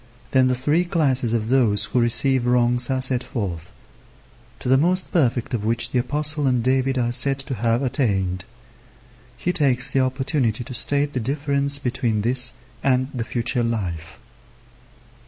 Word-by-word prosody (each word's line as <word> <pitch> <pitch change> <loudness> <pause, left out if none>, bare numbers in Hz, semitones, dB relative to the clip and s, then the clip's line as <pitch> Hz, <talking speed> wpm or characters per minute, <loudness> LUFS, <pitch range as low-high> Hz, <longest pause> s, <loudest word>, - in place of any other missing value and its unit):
Then 130 -1 +3
the 130 - +1
three 145 +7 +1
classes 135 -9 0
of 115 -1 -1
those 110 -6 +2
who 125 - -1
receive 120 +2 +1
wrongs 120 0 +2
are 130 -1 0
set 130 -1 +1
forth; 90 -7 -5 0.9
to 125 - -8
the 130 - +4
most 180 +6 +1
perfect 125 -8 0
of 110 -4 -2
which 115 +1 0
the 125 - +1
Apostle 150 +3 0
and 125 -3 +1
David 130 +1 +1
are 120 -1 0
said 135 +2 +4
to 135 0 -5
have 115 +2 0
attained. 95 -9 -1 0.9
He 180 +7 -2
takes 135 -4 +2
the 135 - +1
opportunity 130 -2 -1
to 130 +2 -9
state 140 +5 +2
the 130 - -2
difference 140 +2 0
between 125 -5 -2
this 125 +2 +1 0.3
and 130 0 +1
the 120 -3 -3
future 120 +2 -2
life. 95 -7 -4
125 Hz, 160 wpm, -22 LUFS, 115-135 Hz, 0.9 s, the